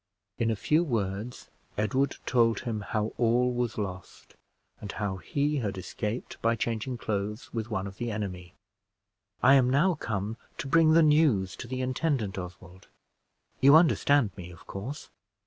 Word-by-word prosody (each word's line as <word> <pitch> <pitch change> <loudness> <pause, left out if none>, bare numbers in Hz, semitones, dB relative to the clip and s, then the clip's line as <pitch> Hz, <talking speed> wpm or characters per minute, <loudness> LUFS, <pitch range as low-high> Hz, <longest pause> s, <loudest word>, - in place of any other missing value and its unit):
In 115 - +1
a 110 - +1
few 155 - +2
words 110 - -3 0.3
Edward 130 +6 +1
told 115 -3 +2
him 115 -4 -3
how 105 +1 -2
all 125 +1 +3
was 120 -2 -2
lost, 95 -4 -6 0.5
and 105 - -7
how 100 -1 -3
he 145 - -1
had 105 -7 -2
escaped 105 +5 -5
by 115 +1 +2
changing 115 +2 -2
clothes 105 0 -4
with 115 -1 -3
one 100 -4 -2
of 95 0 -8
the 120 -1 -3
enemy. 95 -5 -5 0.9
"I 135 - +7
am 130 -2 +5
now 150 +8 +3
come 110 - -3 0.2
to - - -4
bring 155 +2 +5
the 165 0 +6
news 150 - +3
to - - -7
the 130 +1 -3
intendant, 130 -6 -1
Oswald. 90 0 -10 0.7
You 140 +2 +7
understand 145 - +4
me, 90 -3 -8
of 85 -2 -14
course?" 125 +10 -7
115 Hz, 160 wpm, -28 LUFS, 100-135 Hz, 0.9 s, I